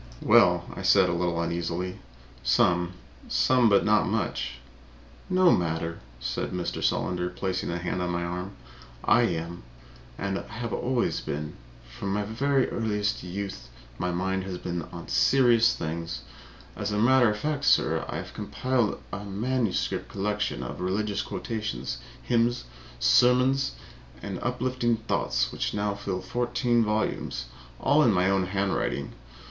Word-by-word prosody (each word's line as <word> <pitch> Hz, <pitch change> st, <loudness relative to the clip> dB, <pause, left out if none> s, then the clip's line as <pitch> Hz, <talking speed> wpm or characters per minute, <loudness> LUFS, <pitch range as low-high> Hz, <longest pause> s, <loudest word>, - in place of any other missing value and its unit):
"Well," -, -, +5 dB
I -, -, -6 dB
said, -, -, +5 dB
a -, -, 0 dB
little 85 Hz, -1 st, 0 dB
uneasily, 85 Hz, +2 st, -2 dB, 0.4 s
"some. 85 Hz, +7 st, +2 dB, 0.3 s
Some, 125 Hz, -3 st, +4 dB
but 100 Hz, -1 st, +4 dB
not 110 Hz, 0 st, +4 dB
much." 110 Hz, -2 st, -1 dB, 0.8 s
"No 185 Hz, -1 st, +5 dB
matter," 85 Hz, -1 st, 0 dB, 0.2 s
said -, -, -2 dB
Mr. 90 Hz, -1 st, -3 dB
Solander, 90 Hz, -1 st, 0 dB
placing 95 Hz, +1 st, -3 dB
a 85 Hz, -, -1 dB
hand 90 Hz, +1 st, -2 dB
on 90 Hz, -, -1 dB
my 85 Hz, 0 st, -1 dB
arm. 90 Hz, +3 st, -4 dB, 0.5 s
"I 120 Hz, +2 st, +5 dB
am. 85 Hz, 0 st, -4 dB, 0.6 s
I -, -, -6 dB, 0.3 s
have 120 Hz, +1 st, -4 dB
always 125 Hz, -1 st, 0 dB
been. 75 Hz, +1 st, -4 dB, 0.3 s
From 60 Hz, +11 st, -4 dB
my 105 Hz, +1 st, 0 dB, 0.2 s
earliest 110 Hz, -6 st, +1 dB
youth 90 Hz, -9 st, -6 dB, 0.3 s
my 90 Hz, -, 0 dB
mind 95 Hz, +2 st, -1 dB
has 95 Hz, -2 st, -4 dB
been 85 Hz, -1 st, -3 dB
on -, -, -8 dB
serious 115 Hz, -, +4 dB
things. 85 Hz, +1 st, -4 dB, 0.5 s
As -, -, -3 dB
a 105 Hz, -, 0 dB
matter 120 Hz, +2 st, +5 dB
of 105 Hz, -, -1 dB
fact, 150 Hz, +3 st, -2 dB
sir, -, -, +3 dB
I -, -, -4 dB
have -, -, -7 dB
compiled 130 Hz, -4 st, -1 dB
a 100 Hz, +1 st, -4 dB
manuscript 110 Hz, +2 st, -1 dB
collection 105 Hz, -8 st, -2 dB
of -, -, -6 dB
religious 100 Hz, +3 st, 0 dB
quotations, 65 Hz, -, -4 dB, 0.2 s
hymns, 120 Hz, 0 st, +1 dB, 0.3 s
sermons 125 Hz, -, +4 dB, 0.5 s
and 95 Hz, +4 st, -5 dB
uplifting 125 Hz, -1 st, 0 dB
thoughts 65 Hz, -, 0 dB
which -, -, -2 dB
now 105 Hz, 0 st, 0 dB
fill 100 Hz, -2 st, -4 dB
fourteen 120 Hz, +2 st, +1 dB
volumes, 105 Hz, -, -1 dB, 0.3 s
all 145 Hz, +3 st, +4 dB
in 120 Hz, -, +5 dB
my 95 Hz, 0 st, +3 dB
own 95 Hz, -2 st, +1 dB
handwriting. 100 Hz, 0 st, -1 dB
100 Hz, 140 wpm, -27 LUFS, 90-120 Hz, 0.8 s, Well